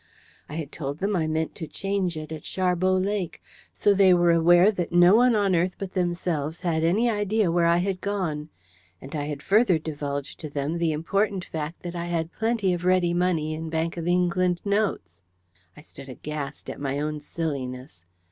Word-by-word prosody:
I 150 - -6
had 160 -2 -5
told 140 -2 -5
them 200 +4 -1
I 160 -3 0
meant 160 0 -1
to 160 - -6
change 190 +1 -2
it 155 0 -7
at 155 - -6
Sharbot 185 0 +1
Lake. 200 -4 -2 0.3
So 205 - +2
they 190 -2 +6
were 175 -1 +4
aware 175 +4 +5
that 180 -5 -3
no 175 +2 +6
one 245 0 +5
on 200 -3 +2
earth 180 +2 +1
but 195 -2 -6
themselves 170 -3 -1
had 165 -3 0
any 200 +9 +3
idea 210 -3 +1
where 170 0 +3
I 170 0 +4
had 185 +1 -1
gone. 170 -7 -2 0.5
And 135 +8 -9
I 145 -1 -2
had 145 -1 -5
further 205 -3 +4
divulged 145 -3 -5
to 155 - -6
them 145 +4 -2
the 165 -1 +1
important 195 +5 -1
fact 160 +1 -6
that 175 0 -5
I 170 0 -3
had 170 -1 -2
plenty 220 -4 0
of 175 0 -4
ready 180 -1 +3
money 175 -3 0
in 160 +1 -5
Bank 165 +1 -1
of 170 -1 -4
England 180 0 +2
notes! 200 - -1 0.6
I - - -11
stood 135 -3 -11
aghast 145 +2 -6
at - - -9
my 140 0 -1
own 150 0 -2
silliness. 130 - -5
170 Hz, 195 wpm, -25 LUFS, 155-185 Hz, 0.6 s, they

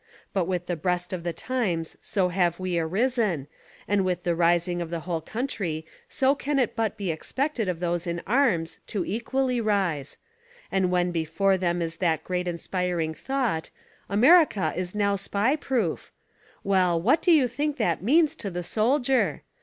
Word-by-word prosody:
But 190 -3 +1
with 180 -1 -2
the 175 - -2
breast 180 +2 -2
of 180 - -3
tlhe 170 0 -3
times 190 -11 -2
so 185 -3 0
have 175 -1 +1
we 185 -2 -1
arisen, 195 - 0 0.4
and 200 -1 +2
with 180 -2 -1
the 175 - +1
rising 175 +1 +2
of 170 - -4
the 170 -1 -3
whole 165 0 -3
country 180 - -3 0.2
so 270 +1 +3
can 285 0 -2
it 250 -4 +1
but 225 -2 -1
be 195 -4 -1
expected 260 - -2
of 175 -2 -2
those 175 0 -1
in 170 0 -2
arms 210 -10 +1
to 195 -5 -2
equally 250 +4 -1
rise; 190 -10 -1 0.5
and 190 -2 +2
when 180 0 +1
before 170 +4 +1
them 175 -2 0
is 165 0 -4
that 160 -4 0
great 180 -1 -2
inspiring 175 -1 -2
thought, 245 - -2 0.4
"America 250 - +5
is 180 +2 -4
now 200 -1 +2
Spy 205 +7 0
proof" 245 - -2 0.3
— - - -31
well, 180 -3 +3
what 240 - +3
do 355 - +3
you 295 -6 +5
think 290 +5 -2
that 175 - 0
means 300 - +3
to 200 - -4
the 180 -1 -4
soldier? 250 - +1
185 Hz, 175 wpm, -26 LUFS, 170-235 Hz, 0.5 s, America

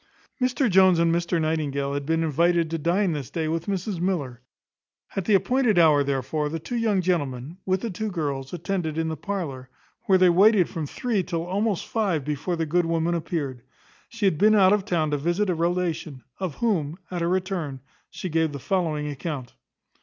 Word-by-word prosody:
Mr 255 +1 +2
Jones 190 -3 +5
and 165 0 +3
Mr 170 0 0
Nightingale 145 -3 -1
had 140 0 -3
been 165 0 +1
invited 165 +2 +2
to 165 - -2
dine 180 +4 +1
this 145 -5 -4
day 160 -2 -2
with 165 +1 -2
Mrs 195 -1 -2
Miller. 150 -10 -2 0.7
At 195 - -2
the 210 - +4
appointed 245 0 +2
hour, 155 -4 +5
therefore, 140 +2 -1
the 165 - -3
two 165 +10 -6
young 220 -5 +1
gentlemen, 145 -3 -2
with 190 0 +1
the 230 - -3
two 215 +4 -3
girls, 140 -7 -3
attended 175 -2 -3
in 165 0 0
the 160 - -3
parlour, 155 -11 -5 0.4
where 190 -2 +6
they 185 -1 +5
waited 195 +1 +5
from 160 -3 -4
three 225 - -1
till 170 -2 -3
almost 200 +2 -1
five 190 - -1
before 150 +4 -2
the 165 -1 -1
good 170 +2 +1
woman 165 +1 0
appeared. 155 -6 -3 0.5
She 230 -3 -3
had 160 -6 +2
been 215 +1 +5
out 195 -1 +6
of 205 -2 +1
town 155 -4 0
to 145 - +1
visit 175 +7 0
a - - +1
relation, 170 -5 -2 0.2
of 185 -7 -3
whom, 170 -9 0
at 175 -2 -3
her 170 - +1
return, 180 -7 -2 0.3
she - - -6
gave 160 -2 0
the - - -4
following 155 -2 -1
account. 145 -3 -5
170 Hz, 195 wpm, -25 LUFS, 150-190 Hz, 0.7 s, where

